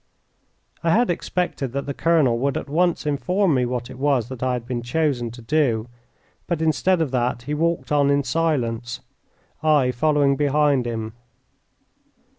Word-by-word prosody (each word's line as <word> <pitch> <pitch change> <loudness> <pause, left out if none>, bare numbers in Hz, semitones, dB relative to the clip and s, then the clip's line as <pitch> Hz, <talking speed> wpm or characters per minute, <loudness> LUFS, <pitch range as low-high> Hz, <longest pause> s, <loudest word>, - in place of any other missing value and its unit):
I 165 - +1
had 235 -3 +3
expected 175 -7 -2
that 140 0 -3
the 140 - -3
colonel 150 -7 +2
would 140 +1 0
at - - -5
once 170 +3 +1
inform 180 +5 +1
me 125 -2 +1
what 120 -1 -3
it 130 0 -11
was 135 -4 +1
that 130 -2 -8
I 130 0 +1
had 120 -2 -4
been 120 -1 -3
chosen 125 -1 -1
to 120 +1 -11
do, 120 -5 +1 0.6
but 170 -3 -1
instead 165 +3 +2
of 145 - -4
that 120 -1 -1
he 145 - -4
walked 165 +2 -1
on 145 -1 +3
in 140 0 +2
silence, 120 -5 -1 0.6
I 150 -5 +3
following 140 +2 +2
behind 145 -3 +2
him. 110 -2 -4
140 Hz, 165 wpm, -22 LUFS, 120-155 Hz, 0.6 s, had